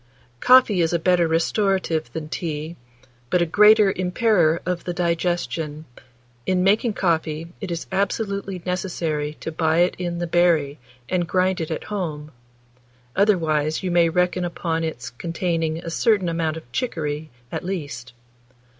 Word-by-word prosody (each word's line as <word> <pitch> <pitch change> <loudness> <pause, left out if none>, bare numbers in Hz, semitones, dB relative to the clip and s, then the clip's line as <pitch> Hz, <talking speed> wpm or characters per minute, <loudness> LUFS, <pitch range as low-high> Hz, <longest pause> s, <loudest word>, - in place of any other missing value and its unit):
Coffee 250 - +5
is 165 0 +1
a - - +3
better 175 0 +3
restorative 170 0 0
than 160 -1 -5
tea, 155 0 -4 0.5
but 180 - +2
a 170 - +3
greater 210 +3 +6
impairer 180 -3 +2
of 180 -1 -2
the 175 - -4
digestion. 170 -3 -1 0.6
In 185 -1 +2
making 215 +4 +3
coffee, 165 -3 -1
it 195 - -4
is 170 -1 -4
absolutely 200 -1 -2
necessary 165 -5 -2
to 165 - -4
buy 160 +1 +2
it 180 - +3
in 175 -1 -3
the 175 - -2
berry, 165 -4 +2 0.3
and 175 -2 0
grind 185 0 +1
it 160 - -3
at 160 - -3
home; 155 -7 -4 0.8
otherwise, 160 -7 +2
you 185 - -1
may 170 -1 +4
reckon 180 +1 +1
upon 165 -1 -2
its 140 -6 -5
containing 165 +3 -2
a 165 0 -6
certain 200 -1 +2
amount 165 -1 -1
of 120 -7 -12
chicory, 155 - -3 0.2
at - - -4
least. 145 -9 -5
170 Hz, 145 wpm, -23 LUFS, 160-185 Hz, 0.8 s, greater